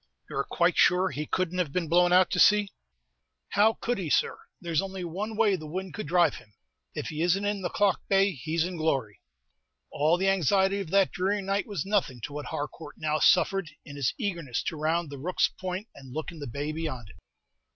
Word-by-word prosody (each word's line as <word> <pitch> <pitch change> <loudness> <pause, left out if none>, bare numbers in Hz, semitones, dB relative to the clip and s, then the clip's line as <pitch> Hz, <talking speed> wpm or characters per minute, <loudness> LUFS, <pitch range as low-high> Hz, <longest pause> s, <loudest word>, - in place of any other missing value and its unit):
"You - - -6
are - - +1
quite - - +1
sure 185 +1 +4
he 150 +3 -4
couldn't 185 0 -1
have 170 -6 0
been 170 +1 -1
blown 175 +2 +4
out 180 0 +5
to - - 0
sea?" 205 -1 +5 0.8
"How 215 +3 +4
could 240 0 -2
he, 175 -5 -3
sir? - - +1 0.2
There's 170 -3 0
only 190 -1 -5
one 205 +6 -4
way 215 -3 +4
the 155 -4 -8
wind 185 +2 -5
could 150 - -5
dhrive 170 -2 +3
him. 105 - -17 0.4
If - - -4
he 155 0 -4
isn't 180 +4 +2
in 205 -1 -1
the 175 - -2
Clough 200 -3 +2
Bay, 195 0 +4
he's 160 +3 -1
in 180 -1 -5
glory." 135 -10 -1 0.7
All 155 +4 +2
the 190 +2 0
anxiety 195 +2 +2
of 195 -5 -5
that 195 +1 +3
dreary 195 +2 -1
night 195 +1 -1
was 200 -8 -3
nothing 195 -11 0
to 145 - -6
what 150 0 -5
Harcourt 150 +1 -6
now 155 0 -1
suffered, 195 -4 +3 0.2
in 145 - -10
his 140 -3 -1
eagerness 170 - -3
to - - -3
round 160 +1 -1
the 140 - -7
Rooks' 180 +6 +1
Point, 185 +3 -4
and 135 -2 -13
look 155 +5 -4
in 165 - -11
the 145 - -6
bay 145 +5 -3
beyond 150 -9 -5
it. - - -19
175 Hz, 215 wpm, -28 LUFS, 150-195 Hz, 0.8 s, out